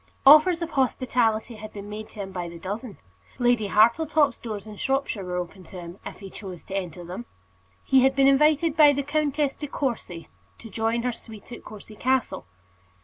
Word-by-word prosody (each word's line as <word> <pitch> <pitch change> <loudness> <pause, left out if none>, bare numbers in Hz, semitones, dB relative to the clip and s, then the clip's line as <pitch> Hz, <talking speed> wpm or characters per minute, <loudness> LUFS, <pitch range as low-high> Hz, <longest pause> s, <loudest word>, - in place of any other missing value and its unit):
Offers 310 +5 +7
of 335 - -5
hospitality 240 -4 0
had 215 0 -9
been 205 -1 -8
made 215 +1 -7
to 210 - -8
him 190 -1 -6
by 175 -2 -4
the 170 - -10
dozen. 205 +6 -6 0.4
Lady 240 -4 +2
Hartletop's 275 +7 +3
doors, 215 -4 -6
in 215 -1 -9
Shropshire, 270 -6 -1
were 180 -1 -4
open 180 +1 -5
to 180 - -10
him, 175 +2 -10
if - - -9
he 195 -1 -9
chose 185 -5 -9
to 195 - -7
enter 180 -2 -4
them. 185 +8 -7 0.6
He 265 -1 +4
had 265 +1 +3
been 275 0 +5
invited 300 +3 +4
by 295 -3 +7
the 280 0 -1
Countess 290 -1 0
De 295 - -7
Courcy 235 - -4 0.3
to 225 - -12
join 225 +1 -1
her 250 - 0
suite 225 -1 -12
at 240 - -9
Courcy 215 0 -11
Castle. 260 - -1
230 Hz, 195 wpm, -25 LUFS, 200-275 Hz, 0.6 s, Offers